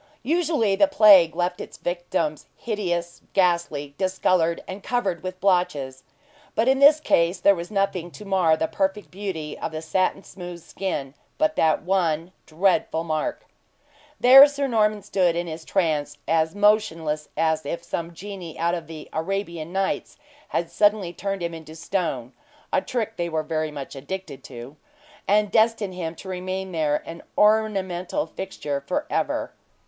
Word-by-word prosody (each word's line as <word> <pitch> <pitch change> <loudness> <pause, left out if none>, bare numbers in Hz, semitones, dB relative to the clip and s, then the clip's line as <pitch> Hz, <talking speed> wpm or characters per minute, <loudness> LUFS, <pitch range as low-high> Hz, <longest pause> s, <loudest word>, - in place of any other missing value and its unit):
Usually 300 - +1
the 290 - +4
plague 205 - +7
left 180 0 -1
its - - -9
victims 175 -3 -2
hideous, 175 -6 -3
ghastly, 170 -6 +1
discolored, 185 -3 +1
and 190 +2 -7
covered 195 -10 -1
with 185 0 -6
blotches; 150 -9 0 0.5
but 225 - +2
in 265 0 +4
this 290 +2 +7
case 170 - +2
then 200 - +5
was 170 0 -6
nothing 195 -4 -1
to 210 +4 -12
mar 180 -5 +3
the 160 - 0
perfect 195 +3 -2
beauty 180 -6 -5
of - - -3
the 155 0 -5
satin 185 +4 0
smooth 175 -2 -9
skin, 145 -8 -4 0.2
but 310 0 +1
that 160 -1 +2
one 170 -2 0 0.2
dreadful 165 -1 +1
mark. 160 - -2 0.7
There 270 +3 +10
Sir 285 -1 -2
Norman 215 -4 +1
stood 180 -4 +1
in 175 +1 -1
his 160 -1 -7
trance, 155 -5 0
as 160 +1 +1
motionless 165 -8 +1
as 160 -1 +1
if 170 +4 -4
some 170 0 -4
genie 190 -3 -8
out 170 +1 +1
of 170 -4 -4
the 160 -2 -9
"Arabian 170 -1 -3
Nights" 195 +1 -2 0.3
had 170 - -2
suddenly 205 -4 +2
turned 195 +1 -3
him 170 0 -2
into 160 -1 -10
stone 160 -8 -3 0.4
(a - - +3
trick 225 -2 -3
they 170 0 -2
were 160 -1 -1 0.3
much 140 -1 -7
addicted 140 -1 -7
to), 120 +5 -10 0.5
and 210 0 +3
destined 220 -3 +2
him 170 -2 -4
to 190 - -11
remain 185 +1 -4
there 150 -3 0
an 165 0 -8 0.2
ornamental 210 +2 +2
fixture 150 -7 -5
for - - -1
ever. - - -1
180 Hz, 155 wpm, -24 LUFS, 160-200 Hz, 0.7 s, There